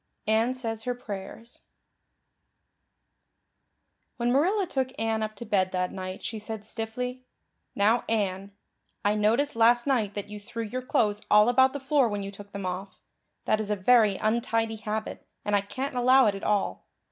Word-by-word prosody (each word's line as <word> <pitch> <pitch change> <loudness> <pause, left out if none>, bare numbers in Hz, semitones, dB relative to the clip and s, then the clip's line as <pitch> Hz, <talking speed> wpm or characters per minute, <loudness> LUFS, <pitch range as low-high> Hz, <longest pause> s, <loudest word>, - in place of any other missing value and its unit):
Anne 220 +3 +2
Says 225 -3 -4
Her 250 0 -1
Prayers 220 +1 -8 2.6
WHEN 240 0 +1
Marilla 370 - +2
took 265 -6 -1
Anne 225 0 0
up 215 0 -3
to 235 - -8
bed 190 -3 +1
that 180 0 0
night 185 0 -6
she 225 - -4
said 215 0 -6
stiffly: 250 +3 -4 0.5
"Now, 220 +4 +3
Anne, 200 -3 -1 0.5
I 205 - +4
noticed 230 +7 +1
last 235 +1 +4
night 225 -8 0
that 205 -1 -4
you 210 0 -8
threw 230 +3 -6
your 250 +4 -4
clothes 210 -4 +1
all 210 +2 +6
about 260 +1 +4
the 285 - -4
floor 270 -2 +2
when 205 -1 -3
you 195 - -5
took 200 0 -12
them 200 -1 -5
off. 185 +2 -5 0.5
That 215 - +2
is 215 -1 -3
a 210 - +1
very 210 0 +4
untidy 225 0 0
habit, 215 0 -4 0.2
and 205 - +2
I 200 - +3
can't 260 +8 -5
allow 255 +1 +5
it 210 - +3
at 195 - -7
all. 205 -2 -1
220 Hz, 170 wpm, -27 LUFS, 205-245 Hz, 2.6 s, all